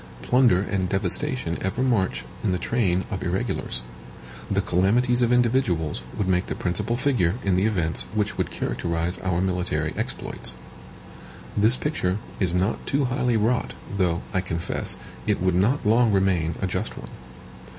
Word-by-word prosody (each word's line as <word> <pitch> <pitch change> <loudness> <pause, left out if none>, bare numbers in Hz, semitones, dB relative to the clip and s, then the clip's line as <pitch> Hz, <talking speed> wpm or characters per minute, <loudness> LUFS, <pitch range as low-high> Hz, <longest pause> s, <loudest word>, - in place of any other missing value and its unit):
PLUNDER 125 -7 +4
and 95 -3 -1
devastation 100 - +1
ever 95 +7 -1
march 115 -8 +1 0.2
in 100 - +1
the - - +1
train 95 -4 0
of - - -3
irregulars. - - -2 0.7
The 100 - +1
calamities 110 +7 +2
of 120 0 +3
individuals 115 - +2 0.2
would 100 - 0
make 90 0 +1
the - - -3
principal 90 +6 -1
figure 110 -10 +2
in 95 -2 +2
the 95 +4 +3
events 85 -7 +1
which 105 -1 0
would - - -1
characterize 85 +1 -2
our 90 -2 0
military 90 -2 -1
exploits. 60 - -4 1.0
This 110 +5 +4
picture 95 -11 -1 0.2
is 95 -3 +1
not 90 +4 0
too 140 0 +2
highly 125 -1 +1
wrought; 115 +4 0 0.2
though, 90 -3 +1
I 95 - +2
confess, 85 -3 -3 0.3
it - - +2
would 95 0 +2
not 105 +11 +2
long 115 +2 +4
remain 95 -5 +2
a - - +3
just 90 - -3
one. - - -9
95 Hz, 155 wpm, -25 LUFS, 90-120 Hz, 1.0 s, PLUNDER